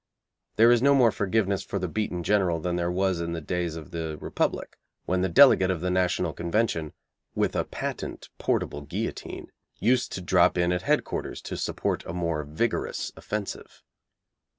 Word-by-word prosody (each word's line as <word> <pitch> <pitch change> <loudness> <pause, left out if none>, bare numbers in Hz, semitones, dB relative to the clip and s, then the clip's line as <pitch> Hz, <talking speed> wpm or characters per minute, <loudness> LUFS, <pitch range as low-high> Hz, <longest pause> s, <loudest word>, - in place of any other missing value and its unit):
There 115 +2 +6
is 120 -1 +4
no 140 +1 +5
more 120 -4 +5
forgiveness 100 -1 0
for - - -4
the 90 -1 -2
beaten 90 -2 -2
General 95 -4 +2
than 85 +2 -2
there 85 0 0
was 95 -1 0
in 85 0 -3
the 85 - -3
days 85 +1 -2
of 80 -3 -9
the 80 -2 -4
Republic - - -2 0.3
when 90 0 0
the 95 - +1
delegate 95 -2 +7
of 90 -3 0
the 90 +2 -1
National 90 -1 +1
Convention, 85 -3 -1 0.4
with - - 0
a - - +1
patent - - -5
portable 75 - -1
guillotine, 70 - -5 0.2
used 125 +2 +1
to 95 - -4
drop 90 - +3
in 90 0 +2
at 90 0 0
headquarters - - -1
to - - -5
support - - -2
a 80 - -5
more 85 -3 -1
vigorous 80 +11 -2
offensive. 105 -2 -6
90 Hz, 175 wpm, -26 LUFS, 85-105 Hz, 0.4 s, delegate